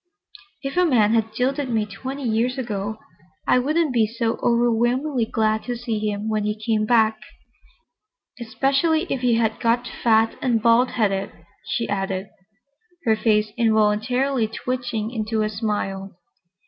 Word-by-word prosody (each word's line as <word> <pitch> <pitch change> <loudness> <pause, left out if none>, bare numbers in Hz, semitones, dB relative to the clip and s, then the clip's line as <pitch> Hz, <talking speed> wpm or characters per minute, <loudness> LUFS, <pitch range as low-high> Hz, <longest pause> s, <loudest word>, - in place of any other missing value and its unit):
"If 275 +4 -4
a 360 - +5
man 225 -7 +3
had 225 -1 +1
jilted 260 +4 -1
me 220 -3 +1
twenty 260 +8 -7
years 240 +2 0
ago, 215 -4 -3 0.5
I 250 - +4
wouldn't 305 +2 +1
be 225 -3 +3
so 230 +1 -2
overwhelmingly 240 +2 +1
glad 220 0 +1
to 245 - -3
see 230 -2 -3
him 210 0 -2
when 215 -1 0
he 210 +1 -2
came 215 -1 0
back—especially 270 - -2
if 260 - -3
he 245 -2 +3
had 225 -1 0
got 240 +1 +1
fat 225 -1 +1
and 240 -4 +2
bald 235 +2 +4
headed," 200 -3 0 0.4
she 235 - -1
added, 195 -1 -2 0.8
her 220 -1 +4
face 215 -1 +1
involuntarily 225 +3 +2
twitching 230 -1 -3
into 220 -2 -1
a 215 - 0
smile. 200 -3 -3
225 Hz, 140 wpm, -22 LUFS, 215-250 Hz, 0.8 s, a